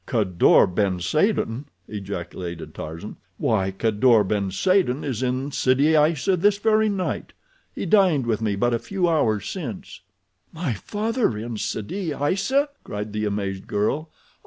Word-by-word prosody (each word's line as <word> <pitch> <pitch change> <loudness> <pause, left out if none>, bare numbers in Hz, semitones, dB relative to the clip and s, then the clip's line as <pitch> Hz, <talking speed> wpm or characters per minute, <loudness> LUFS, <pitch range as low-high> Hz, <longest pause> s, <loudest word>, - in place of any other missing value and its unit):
"Kadour 100 -8 +4
ben 95 0 0
Saden!" 130 - 0 0.2
ejaculated 90 -4 -6
Tarzan. 80 +7 -7 0.2
"Why, 95 -4 +1
Kadour 110 +3 +3
ben 100 0 -1
Saden 155 - +1
is 130 -5 -3
in 130 +2 -1
Sidi 140 +4 +3
Aissa 155 +5 +3
this 200 +3 +3
very 215 +1 +3
night. 195 -3 -3 0.4
He - - -3
dined 185 - +4
with 115 -2 0
me 105 -2 0
but 120 +4 +1
a 115 - +1
few 190 - -1
hours 115 -11 +1
since." 125 - -6 0.5
"My 160 -6 -2
father 215 - -1
in 115 +1 -5
Sidi 155 - -3
Aissa?" 200 - +1
cried 105 0 -5
the 105 0 -1
amazed 100 -2 -3
girl. 145 +10 -1
120 Hz, 140 wpm, -23 LUFS, -, 0.5 s, Kadour